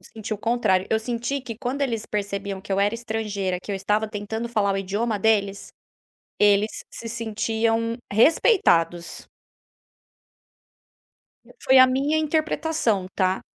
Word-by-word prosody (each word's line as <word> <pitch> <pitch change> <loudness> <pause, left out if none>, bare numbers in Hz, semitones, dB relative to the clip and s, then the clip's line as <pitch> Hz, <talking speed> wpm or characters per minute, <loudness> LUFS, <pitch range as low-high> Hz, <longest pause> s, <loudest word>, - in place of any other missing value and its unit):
senti 220 -1 -4
o - - -9
contrário, 210 -5 +1
eu 220 - +3
senti 240 +4 -3
que 235 -3 -7
quando 265 +2 -3
eles 230 -5 -2
percebiam 200 -1 -3
que 200 +1 -6
eu 195 - +1
era 205 +2 +2
estrangeira, 215 -5 -3
que - - -8
eu 200 - -1
estava 210 +3 0
tentando 220 +2 -4
falar 205 -4 +1
o - - -1
idioma 205 +3 -2
deles, 200 -1 +1 0.7
eles 205 +1 +4 0.2
se 230 - -8
sentiam 225 0 -1
respeitados. 200 - +2 2.4
Foi 265 - +5
a 255 - +9
minha 275 +4 +1
interpretação 310 - 0
tá. 185 -1 +1
220 Hz, 135 wpm, -24 LUFS, 200-235 Hz, 2.4 s, a